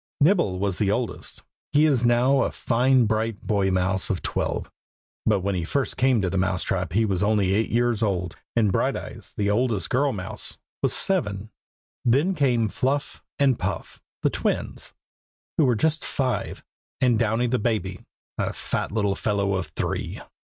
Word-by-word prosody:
Nibble 140 - +3
is 95 -3 -2
the 105 - +2
oldest. 115 +3 -3 0.3
He 150 +2 +5
is 135 -6 +2
now 125 +3 +4
a - - 0
fine 125 +1 +3
bright 110 0 -1
boy 100 -2 +1
mouse 95 +1 +1
of 95 - -2
twelve, - - -2 0.6
but 105 -3 +3
when 100 +2 -1
he 90 -2 -1
first 135 +10 -1
came 125 -5 +2
to 95 - +1
the 95 - 0
mouse 90 -1 0
trap 95 -5 -2
he 110 +3 +3
was 95 -3 0
only 105 -2 +2
eight 110 +3 +1
years 120 -1 +1
old, 90 -5 -1 0.2
and 110 -4 +3
Brighteyes, - - -2
the 100 0 +1
oldest 110 -5 0
girl 140 +3 +2
mouse, 95 -6 -6 0.2
was - - +2
seven. 110 - 0 0.5
Then 140 +11 +3
came 125 -8 +2
Fluff 140 +5 -2 0.2
and 135 -4 +3
Puff, - - -4 0.2
the - - +3
twins, - - -2 0.7
who 155 - +6
were 125 -2 +3
just 155 +7 +1
five, 130 -3 -2 0.4
and 120 -4 +3
Downy 115 +1 +1
the 125 +1 +1
baby, 95 -5 -1 0.4
a - - -1
fat - - -3
little 100 -2 +1
fellow 100 -1 0
of 95 -4 -2
three. 75 - -3
110 Hz, 170 wpm, -25 LUFS, 100-125 Hz, 0.7 s, who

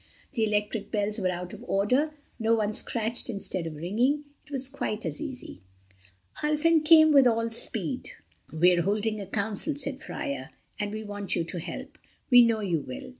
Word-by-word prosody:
The 225 - 0
electric 210 0 -1
bells 210 0 0
were 185 -2 +1
out 180 0 -4
of - - -9
order, 255 +11 +1 0.3
so 225 +1 +4
one 215 -1 0
scratched 230 +2 0
instead 190 -5 -2
of 155 - -6
ringing. 235 - +1 0.2
It - - -21
was 265 -2 -2
quite 225 -5 -4
as - - -4
easy. 270 -5 -7 0.8
Ulfin 305 +1 +3
came 315 0 +7
with 275 -3 +7
all 230 -1 +1
speed. 225 +1 -3 0.4
"We're 175 +2 +4
holding 210 +3 0
a 195 - -7
council," 220 - -1
said 280 -1 -4
Freia, 135 0 -5 0.3
"and 205 -1 -2
we 215 +1 -5
want 205 -1 -4
you 170 - +1
to 170 +1 -5
help. - - -7 0.3
We 245 0 +10
know 230 -2 +2
you 175 -6 0
will." 130 -3 -7
215 Hz, 175 wpm, -28 LUFS, 195-260 Hz, 0.8 s, We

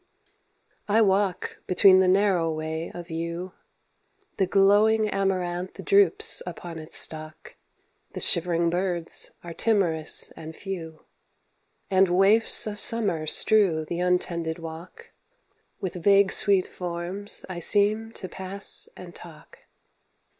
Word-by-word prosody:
I 215 +2 +2
walk 195 -1 -1
between 185 +1 +5
the 190 - +3
narrow 185 -3 +2
way 160 +1 -5
of 175 0 -10
yew. 170 +3 -5 0.8
The 190 - +1
glowing 210 +3 +3
amaranth 185 -3 -3
droops 405 +3 +3
upon 170 -2 -8
its 155 0 -1
stalk, 155 0 -3 0.6
The - - -6
shivering 170 0 +1
birds 175 -2 +2
are 170 -1 -8
timorous 170 -7 +1
and 160 0 -11
few, 165 -5 -8 0.9
And 190 0 +4
waifs 195 +5 +3
of 210 -1 -6
Summer 200 -10 -1
strew 185 -5 +2
th' - - -21
untended 175 -2 -1
walk; 165 +1 -11 0.7
With 180 -2 -6
vague 200 -1 +4
sweet 200 -3 +2
forms 180 +3 -5
I 180 -2 -7
seem 210 +4 +2
to 185 - -7
pass 190 +2 0
and 175 -1 -11
talk. 165 -4 -15
185 Hz, 120 wpm, -24 LUFS, 170-200 Hz, 0.9 s, between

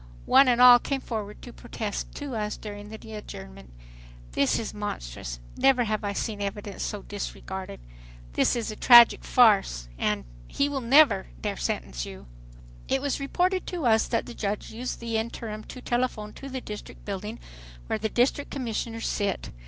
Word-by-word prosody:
One 270 0 +6
and 245 -1 +3
all 250 -1 +10
came 275 +2 -2
forward 215 -5 -6
to 245 - -9
protest 220 -3 -5
to 285 -4 -5
us 210 -1 -2
during 205 -1 -8
the 220 0 -10
adjournment. 65 - -9 0.6
"This 140 - +2
is 225 - -4
monstrous."... - - -5 0.2
"Never 265 -2 +4
have 215 -1 -2
I 205 - -1
seen 210 0 -3
evidence 200 0 -4
so 205 -2 -3
disregarded."... 190 - -6 0.5
"This - - +2
is 230 -2 -2
a - - -7
tragic 240 +1 +8
farce"... 195 - +4 0.6
"He 280 - 0
will 285 -2 -2
never 265 - +5
dare - - -2
sentence - - -3
you." 65 +2 -9 0.6
It 270 - +1
was 285 +1 -1
reported 360 +7 0
to 345 -6 -3
us 220 -2 +4
that 230 - 0
the - - -8
judge 205 -2 -3
used 245 +3 -5
the 230 -1 -1
interim 220 -1 -4
to 255 - -9
telephone 240 -4 -1
to 275 - -9
the 260 -1 -4
District 210 -2 -9
building, 210 +3 -5 0.5
where 220 - -2
the 220 +1 -1
District 255 +5 +1
Commissioners 230 -3 -3
sit. 200 -3 -2
220 Hz, 170 wpm, -27 LUFS, 205-250 Hz, 0.6 s, all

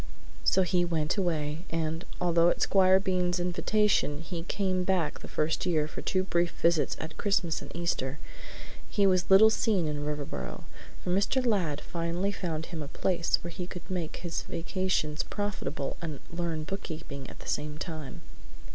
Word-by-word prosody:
So 190 - +4
he 180 0 +2
went 165 -2 0
away, 165 -4 -1
and, 165 +1 -2
although 170 -1 +4
at - - 0
Squire 190 -1 +5
Bean's 180 -2 +1
invitation 180 -3 +2
he 165 0 -5
came 185 +1 0
back 180 -4 +1
the - - -9
first 155 +1 0
year 155 -4 +2
for - - -7
two 185 0 +1
brief 175 -2 +1
visits 170 -2 +3
at 160 - -6
Christmas 185 -5 +1
and - - -9
Easter, 155 -5 -1 0.7
he 200 - +3
was 185 -1 +3
little 210 +3 +8
seen 205 -7 +2
in 145 -1 -2
Riverboro, 140 - -4 0.4
for 180 - -1
Mr. 205 +8 +2
Ladd 175 -10 +1
finally 170 +3 -1
found 165 -5 -3
him 165 -3 -6
a 145 - -5
place 170 +2 +1
where 170 - -5
he 175 +1 -5
could 180 0 -8
make 175 -4 -2
his 170 -2 -3
vacations 165 -3 -1
profitable 190 -9 -3
and 155 -5 -4
learn 170 -2 -2
bookkeeping 155 -6 -6
at - - -11
the - - -11
same 150 0 -2
time. 155 -5 -6
170 Hz, 165 wpm, -29 LUFS, 155-185 Hz, 0.7 s, little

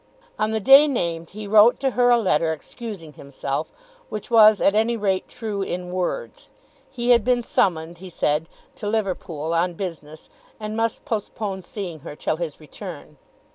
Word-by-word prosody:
On 215 - +1
the 220 0 0
day 270 +8 +8
named 170 - -2
he 210 +1 -8
wrote 215 +3 +6
to 270 -1 +1
her 245 0 +3
a 240 - +6
letter 165 -7 +1
excusing 165 0 -8
himself, 140 0 -4 0.4
which 215 +2 -6
was 215 -2 +7
at 200 - +3
any 225 +2 +2
rate 195 -3 0
true 215 -4 -5
in 180 -2 -4
words. 185 - -4 0.4
He 245 -2 0
had 235 -3 +5
been 245 +1 +2
summoned, 170 -5 0
he 185 0 -9
said, 155 -1 0 0.3
to 205 - -5
Liverpool 180 -7 -2
on 170 +1 +1
business, 160 -4 -7 0.3
and 215 0 -5
must 225 0 -1
postpone 205 -3 -3
seeing 180 -4 -6
her 150 0 -9
till 155 - -2
his 165 -3 -5
return. 155 -1 -10
195 Hz, 170 wpm, -23 LUFS, 165-225 Hz, 0.4 s, day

